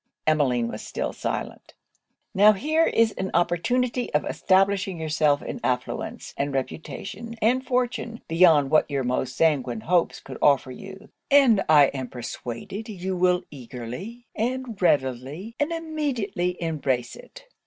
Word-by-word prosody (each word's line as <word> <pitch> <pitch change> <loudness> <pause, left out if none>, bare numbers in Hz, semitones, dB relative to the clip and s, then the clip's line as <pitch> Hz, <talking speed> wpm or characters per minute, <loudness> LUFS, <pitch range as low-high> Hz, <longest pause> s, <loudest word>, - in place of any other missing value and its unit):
Emmeline 135 -7 +2
was - - -6
still - - -4
silent. - - -5 0.6
'Now 210 +2 +7
here 310 +10 +1
is 230 -1 +3
an 190 0 -2
opportunity 240 +9 0
of 150 - +2
establishing 195 -1 +1
yourself 155 -2 +1
in - - -5
affluence, 125 -1 -3
and 140 +1 -1
reputation, 185 - -5
and 245 +4 +2
fortune, 245 -2 -2
beyond 160 -4 +4
what 155 - +4
your 140 -2 -1
most 125 +1 -2
sanguine 130 -8 +1
hopes 175 +4 +1
could - - -10
offer 140 -2 +3
you; 195 +8 -11 0.2
and 270 -8 +6
I 145 -3 +6
am 130 -2 -4
persuaded 125 - -7
you 190 -2 -4
will 180 0 +2
eagerly, 135 - -8
and 240 -1 -3
readily, 145 - 0
and 290 +3 0
immediately 270 - -2
embrace 140 -7 -2
it. - - -14
180 Hz, 135 wpm, -25 LUFS, 140-230 Hz, 0.6 s, Now